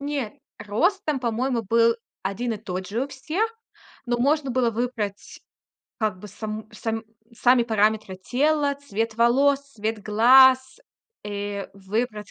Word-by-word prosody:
Не, 280 Hz, -6 st, -3 dB, 0.3 s
рост 345 Hz, -, 0 dB
там, 290 Hz, -4 st, -1 dB
по-моему, 240 Hz, 0 st, -1 dB
был 230 Hz, +2 st, +3 dB, 0.3 s
1 225 Hz, +5 st, -2 dB
и -, -, -3 dB
тот 185 Hz, -3 st, -5 dB
же 230 Hz, +7 st, -1 dB
у -, -, -9 dB
всех, 315 Hz, +11 st, -2 dB, 0.6 s
но 240 Hz, 0 st, 0 dB
можно 280 Hz, +1 st, +1 dB
было 245 Hz, -1 st, +2 dB
выбрать, 220 Hz, -4 st, -4 dB, 0.6 s
как 215 Hz, -5 st, -1 dB
бы, 210 Hz, -, -10 dB
само 215 Hz, +2 st, -6 dB
сам 225 Hz, 0 st, -4 dB, 0.3 s
сами 245 Hz, +1 st, +4 dB
параметры 215 Hz, -3 st, +1 dB
тела, 285 Hz, +7 st, +1 dB
цвет 225 Hz, -5 st, -3 dB
волос, 270 Hz, +5 st, +3 dB
цвет 215 Hz, 0 st, -3 dB
глаз. 260 Hz, -, +5 dB, 0.4 s
Э, 205 Hz, -1 st, -4 dB
выбрать, 210 Hz, +2 st, -3 dB
230 Hz, 135 wpm, -24 LUFS, 210-265 Hz, 0.6 s, глаз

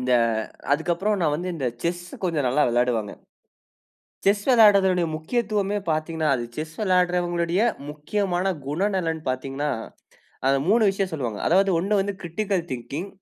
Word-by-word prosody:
இந்த 125 Hz, 0 st, 0 dB, 0.6 s
அதுக்கு 160 Hz, +4 st, +1 dB
அப்புறம் 205 Hz, +4 st, 0 dB
நான் 150 Hz, -2 st, +2 dB
வந்து 175 Hz, +4 st, -3 dB
இந்த 135 Hz, -6 st, -2 dB, 0.2 s
செஸ்சு 175 Hz, +1 st, -3 dB
கொஞ்சம் 160 Hz, -7 st, 0 dB
நல்லா 135 Hz, +4 st, +2 dB
விளையாடுவேங்க. 120 Hz, -3 st, 0 dB, 1.1 s
செஸ் 200 Hz, +1 st, +3 dB
விளையாடுவதனுடைய 195 Hz, -7 st, +5 dB
முக்கியத்துவமே 205 Hz, +3 st, -1 dB
பார்த்தீங்கனா, 155 Hz, 0 st, -1 dB
அது 120 Hz, -, -3 dB
செஸ் 155 Hz, +1 st, -5 dB
விளையாடுன்றவர்களுடைய 180 Hz, -1 st, +1 dB, 0.3 s
முக்கியமான 180 Hz, +5 st, -2 dB, 0.2 s
குணநலன் 170 Hz, 0 st, -1 dB
பார்த்தீங்கன்னா, 135 Hz, +3 st, -2 dB, 0.8 s
அந்த 135 Hz, 0 st, +4 dB
3 220 Hz, +3 st, +4 dB
விஷயம் 195 Hz, -1 st, -2 dB
சொல்வாங்க. 120 Hz, -8 st, -3 dB
அதாவது 195 Hz, +3 st, +4 dB
ஒன்னு 200 Hz, +3 st, +1 dB
வந்து 200 Hz, +1 st, -2 dB
கிரிட்டிக்கல் 185 Hz, +1 st, -2 dB
திங்கிங் 140 Hz, +9 st, -5 dB
175 Hz, 130 wpm, -24 LUFS, 150-195 Hz, 1.1 s, விளையாடுவதனுடைய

